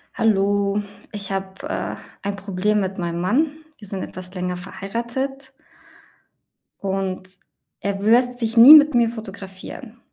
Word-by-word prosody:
Hallo. 200 -1 +1 0.3
Ich 200 -2 -6
habe, 190 0 -5
äh, - - -3 0.3
ein 200 0 -3
Problem 200 +1 0
mit 190 0 -3
meinem 170 -1 -3
Mann. 245 - +2 0.3
Wir 210 - -11
sind 190 -1 -4
etwas 185 0 -7
länger 180 0 -3
verheiratet 240 +8 -5 1.3
und 190 -1 -3 0.4
er 200 0 -3
w 215 - +2
lässt 245 +1 +3
sich 230 0 -1
nie 245 +6 +11
mit 300 -2 +8
mir 235 -1 +4
fotografieren. 205 0 -9
200 Hz, 135 wpm, -22 LUFS, 190-235 Hz, 1.3 s, nie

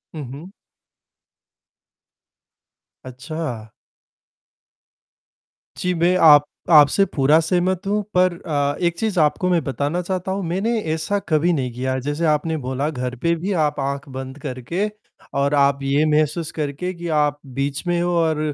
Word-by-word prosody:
हुँ, 150 - -5
हुँ। 165 +8 -10 2.5
अच्छा! 130 -3 -6 2.1
जी, 180 0 -1
मैं 175 +2 +2
आप 145 -2 +8 0.3
आपसे 150 +6 +6
पूरा 145 +3 +4
सहमत 180 +3 0
हूँ 210 +1 +1
पर 180 0 +4
अ, 145 -2 0
1 170 0 0
चीज़ 215 -5 0
आपको 160 +4 +2
मैं 170 -4 +2
बताना 145 +6 -2
चाहता 185 +1 -3
हूँ। 195 0 -2
मैंने 215 +7 0
ऐसा 180 +6 -1
कभी 165 +3 +2
नहीं 130 -5 -2
किया, 130 +1 -2
जैसे 145 +5 -2
आपने 155 +1 +1
बोला 130 +3 -1
घर 125 -4 -4
पे 170 0 +2
भी 185 +5 -3
आप 150 -1 -1
आँख 140 +1 -3
बंद 130 +1 -7
करके 145 - -3 0.5
और 140 +1 +1
आप 140 0 +3
ये 140 +3 +2
महसूस 155 +1 +1
करके 155 +5 -3
कि 170 0 -7
आप 150 -2 +1 0.2
बीच 140 +1 -2
में 175 0 +1
हो 175 - 0
और 160 -2 +1
155 Hz, 145 wpm, -21 LUFS, 140-175 Hz, 2.5 s, आप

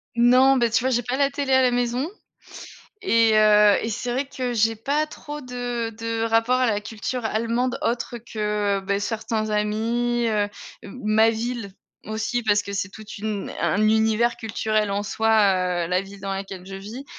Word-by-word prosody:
Non, 255 +3 +5
beh, 235 -1 +2
tu 230 +1 +2
vois 260 - +1
j'ai 245 0 +2
pas 245 +3 -3
la 280 -1 +2
télé 280 -2 -1
à 260 0 +5
la 250 - +3
maison 245 +4 0 0.9
et 230 - +3
heu 210 -1 +6
et 225 - -3
c'est 240 +3 -3
vrai 265 +2 -1
que 255 -3 -4
j'ai 225 0 +2
pas 285 +7 -1
trop 295 -1 -8
de 245 -2 -4
de 230 0 -3
rapport 230 +2 +2
à 255 - +2
la 210 -2 0
culture 225 +3 -5
allemande 235 +4 -1
autre 240 -3 -2
que, 210 -3 -1
heu, - - -5
beh, 200 +1 -1
certains 215 +1 -2
amis, 230 +3 0
heu, 205 -1 +1 0.3
m 250 - -10
ma 220 +1 +4
ville 225 -3 -4 0.3
aussi 220 +3 -2
parce 205 -1 +3
que 200 - -7
c'est 200 0 -2
toute 215 -1 -10
une 210 -1 -4
un 210 - +1
univers 220 +2 +2
culturel 215 -2 -1
en 200 +1 -1
soi, 220 +2 -1 0.6
heu, - - -5
la 180 0 +2
ville 195 0 -11
dans 195 0 -4
laquelle 195 -1 -6
je 195 +1 -9
vis 220 +8 -8
225 Hz, 190 wpm, -23 LUFS, 210-245 Hz, 0.9 s, heu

